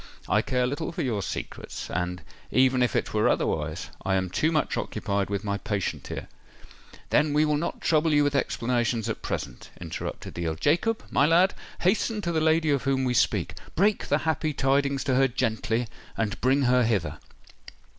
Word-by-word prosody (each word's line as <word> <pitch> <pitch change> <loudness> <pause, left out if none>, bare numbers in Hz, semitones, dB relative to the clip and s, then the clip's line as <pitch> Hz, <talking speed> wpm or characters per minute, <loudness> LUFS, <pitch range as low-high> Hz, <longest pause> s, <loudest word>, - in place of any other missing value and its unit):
"I - - +3
care 125 -1 0
little 145 +7 -2
for - - -3
your 115 -6 -1
secrets; - - -5
and, 90 +1 -2 0.3
even 130 0 +3
if 125 -4 +2
it - - -1
were - - +3
otherwise, 80 +2 -1
I 95 - +1
am 95 -1 -1
too 155 - +1
much 155 -2 0
occupied 100 0 -2
with 100 0 -2
my 100 -1 -2
patient 100 -2 -3
here——" - - -6 0.8
"Then 150 -1 +3
we 150 +1 +4
will 150 -1 +2
not 150 +4 -3
trouble 160 0 +2
you 145 -1 +4
with 145 0 +1
explanations 120 -4 0
at - - -4
present," 65 -4 -5
interrupted 85 -3 -6
the 85 -1 -3
Earl. 80 - -1
"Jacob, 170 - +1
my 140 - +4
lad, 175 +4 +4 0.3
hasten 215 +4 +1
to 170 -3 -2
the 160 -1 +1
lady 160 0 +3
of 140 -2 +2
whom 135 -1 +1
we 125 -1 +1
speak—break 195 - 0
the 145 - +3
happy 155 -1 0
tidings 140 0 +1
to 130 - 0
her 135 +1 +4
gently—and 115 -2 -2
bring 135 +3 +3
her 125 0 +4
hither." 85 -10 0
130 Hz, 180 wpm, -26 LUFS, 105-150 Hz, 0.8 s, we